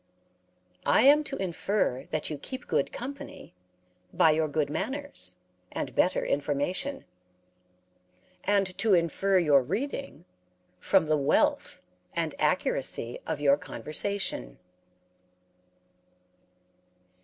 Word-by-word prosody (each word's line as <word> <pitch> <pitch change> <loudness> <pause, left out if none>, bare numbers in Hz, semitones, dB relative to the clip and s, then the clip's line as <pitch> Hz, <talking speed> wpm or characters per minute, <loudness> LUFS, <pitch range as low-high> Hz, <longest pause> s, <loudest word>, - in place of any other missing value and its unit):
I - - +5
am 290 +3 +7
to 275 - -3
infer 185 -6 -1
that 155 0 -2
you 150 - -4
keep 260 - -6
good - - 0
company 275 +3 -8 0.6
by 160 - +5
your 155 0 +1
good 150 0 0
manners 260 - -4 0.4
and - - -4
better - - +2
information; 145 - -1 1.4
and 195 -2 +1
to 210 -1 +4
infer 180 +3 +2
your 150 -6 +5
reading 205 - -4 0.5
from 160 - +3
the 155 0 +2
wealth, 140 -1 +1 0.3
and 165 -2 -1
accuracy 135 -6 0
of 160 -2 -2
your 140 -1 +4
conversation." 155 - -3
165 Hz, 100 wpm, -28 LUFS, 145-205 Hz, 1.4 s, am